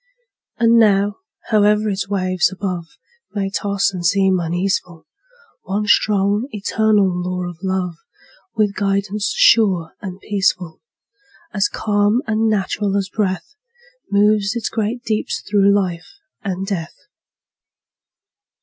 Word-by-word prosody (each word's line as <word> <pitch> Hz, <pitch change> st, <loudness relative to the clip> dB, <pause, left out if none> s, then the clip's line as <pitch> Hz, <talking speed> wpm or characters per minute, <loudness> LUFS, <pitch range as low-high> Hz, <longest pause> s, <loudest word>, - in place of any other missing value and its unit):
And 230 Hz, 0 st, +4 dB
now, 205 Hz, -1 st, +3 dB, 0.3 s
howe'er 210 Hz, 0 st, +3 dB
its 195 Hz, -1 st, -2 dB
waves 185 Hz, -2 st, +1 dB
above 180 Hz, -3 st, -4 dB, 0.5 s
May 195 Hz, -1 st, -1 dB
toss 200 Hz, 0 st, 0 dB
and 180 Hz, -2 st, -5 dB
seem 190 Hz, +1 st, +3 dB
uneaseful, 175 Hz, 0 st, -2 dB, 0.6 s
One 205 Hz, +2 st, -2 dB
strong, 205 Hz, +2 st, +2 dB
eternal 215 Hz, -2 st, +1 dB
law 180 Hz, 0 st, -2 dB
of 175 Hz, -2 st, -9 dB
Love, 185 Hz, -3 st, -2 dB, 0.6 s
With 210 Hz, -2 st, +1 dB
guidance 200 Hz, +1 st, -1 dB
sure 185 Hz, -8 st, +4 dB
and 190 Hz, -2 st, -7 dB
peaceful, 190 Hz, -5 st, -1 dB, 0.7 s
As 200 Hz, -1 st, +1 dB
calm 205 Hz, +3 st, +1 dB
and 220 Hz, -1 st, +1 dB
natural 200 Hz, -1 st, 0 dB
as 195 Hz, -1 st, -2 dB
breath, 190 Hz, -, -2 dB, 0.6 s
Moves 205 Hz, +1 st, +2 dB
its 235 Hz, -, -2 dB
great 225 Hz, +2 st, -2 dB
deeps 215 Hz, -4 st, -2 dB
through 200 Hz, -1 st, +4 dB
life 185 Hz, -, -2 dB, 0.2 s
and 190 Hz, -2 st, -3 dB
death. 180 Hz, -5 st, -4 dB
200 Hz, 115 wpm, -19 LUFS, 185-210 Hz, 0.7 s, And